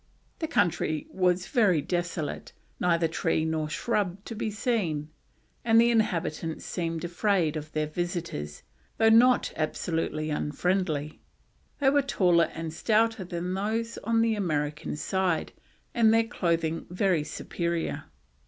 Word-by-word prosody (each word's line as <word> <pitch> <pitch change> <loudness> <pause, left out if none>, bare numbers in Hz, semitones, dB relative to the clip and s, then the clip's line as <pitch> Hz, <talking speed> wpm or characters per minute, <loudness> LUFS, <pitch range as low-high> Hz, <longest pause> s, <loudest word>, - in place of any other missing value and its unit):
The 320 - -2
country 175 - 0
was 180 -1 +1
very 205 - +3
desolate, 170 -1 -3 0.3
neither 170 -2 +2
tree 160 0 0
nor 160 -1 -1
shrub 195 0 -1
to - - -6
be 220 0 -2
seen, 200 - -1 0.5
and 225 0 +5
the 235 +1 +5
inhabitants 165 -7 -1
seemed 165 -2 -3
afraid 175 -2 +1
of 155 0 -6
their 155 0 0
visitors, 165 - -4 0.3
though 225 - +5
not 245 +3 +5
absolutely 155 -1 -2
unfriendly. 155 0 -1 0.6
They 270 -2 +3
were 285 0 +4
taller 180 -11 +3
and 165 -1 -5
stouter 225 +3 +1
than 175 0 -4
those 220 +4 -2
on 225 +1 +1
the 230 -1 +2
American 150 -8 -2
side, 185 0 0 0.4
and 225 -2 +5
their 225 0 +4
clothing 165 -7 -1
very 180 -3 +1
superior. 170 +2 -3
175 Hz, 130 wpm, -27 LUFS, 160-215 Hz, 0.6 s, and